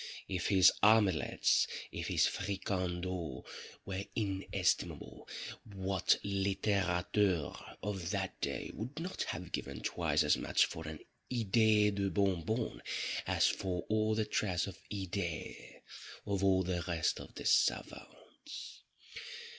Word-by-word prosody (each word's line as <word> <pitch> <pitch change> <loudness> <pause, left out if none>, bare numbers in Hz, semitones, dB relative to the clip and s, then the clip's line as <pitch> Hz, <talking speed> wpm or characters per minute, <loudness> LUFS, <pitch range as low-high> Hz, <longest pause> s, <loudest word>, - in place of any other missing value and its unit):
_ - - -7 0.2
If 90 -3 -1
his 95 -2 +7
omelettes—if 105 -6 +3
his - - +3
fricandeaux 90 -5 -2 0.4
were 95 0 -3
inestimable, 100 -3 -1 0.5
what 95 -1 +2
littérateur 95 -3 0
of 95 -4 -3
that 95 -2 -3
day - - -2
would 125 +8 -6
not 180 +3 -4
have 90 +1 -5
given 70 -2 -4
twice - - +1
as - - +4
much - - +3
for 80 -1 -7
an 80 -1 -7 0.3
"Idée 110 -2 +4
de 100 -1 0
Bon 95 -1 +1
Bon" 110 +7 -2 0.5
as - - +3
for 90 -2 0
all 110 0 +2
the 110 0 +1
trash 95 -4 0
of 95 -4 -8
"Idées" 95 -4 -4 0.4
of 100 -1 -1
all 95 -1 +4
the 90 -1 -1
rest 85 -3 +1
of - - -11
the - - -6
_savants? - - -1
95 Hz, 125 wpm, -34 LUFS, 90-105 Hz, 0.5 s, his